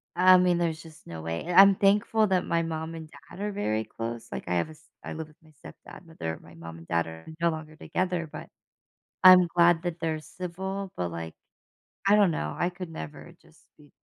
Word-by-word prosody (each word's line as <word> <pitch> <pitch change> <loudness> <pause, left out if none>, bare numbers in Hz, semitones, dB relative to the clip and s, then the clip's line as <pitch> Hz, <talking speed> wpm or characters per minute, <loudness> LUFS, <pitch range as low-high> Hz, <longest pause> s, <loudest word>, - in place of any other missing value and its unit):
I 185 +1 +7
mean, 180 -1 +3
there's 160 -2 -1
just 160 -2 -15
no 80 -1 -7
way. 80 +1 -4
And 175 +2 +4
I'm 195 0 +8
thankful 205 +2 +3
that 185 -1 +1
my 170 0 +1
mom 160 0 -4
and 160 -1 -8
dad 180 - -14
are 205 +1 -2
very 110 - -1
close. 115 +1 -6
Like, - - -5
I 90 - -1
have 85 - +1
a - - -10
s 155 0 -17 0.2
I - - -6
live 160 -1 -6
with 155 - -22
my 155 - -20
stepdad, - - -12
but 165 -1 -18
they're 80 0 -3
my 80 - -16
mom 80 0 -10
and 80 - -14
dad 85 -1 0
are 80 0 -10 0.2
no 170 - +4
longer 155 -1 -6
together, 175 +1 -2
but - - -8 0.8
I'm 185 -1 +9
glad 170 -1 +4
that 175 -1 -4
they're 160 -2 -2
civil, 190 +4 -6
but, 90 -1 -2
like, 80 -1 -6 0.7
I 200 - +6
don't 205 -4 +5
know. 75 - -3
I 175 - +1
could 180 -2 -8
never 80 - -9
just - - -23
be 145 -1 -19
165 Hz, 225 wpm, -27 LUFS, 115-180 Hz, 0.8 s, I'm